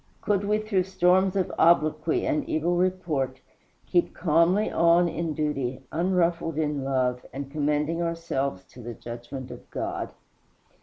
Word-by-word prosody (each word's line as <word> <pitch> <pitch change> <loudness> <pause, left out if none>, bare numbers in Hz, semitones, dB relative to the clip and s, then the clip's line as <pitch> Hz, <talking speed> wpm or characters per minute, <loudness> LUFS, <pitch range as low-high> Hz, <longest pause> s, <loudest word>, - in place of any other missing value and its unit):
Could 200 -1 0
we 210 +1 +2
through 210 -4 0
storms 190 0 +3
of 190 -3 0
obloquy 155 -1 +3
and 150 - +1
evil 170 +3 +1
report 170 -8 0 0.5
keep 175 -2 +1
calmly 170 +5 +3
on 170 +1 +4
in 165 -1 -2
duty, 135 -4 -2
unruffled 170 -2 +1
in 150 -3 -1
love, 130 -2 0
and 135 +1 -6
commending 150 +2 0
ourselves 165 - -2
to 125 - -11
the 120 0 -7
judgment 120 +2 -8
of - - -11
God? - - -3
160 Hz, 140 wpm, -26 LUFS, 140-175 Hz, 0.5 s, on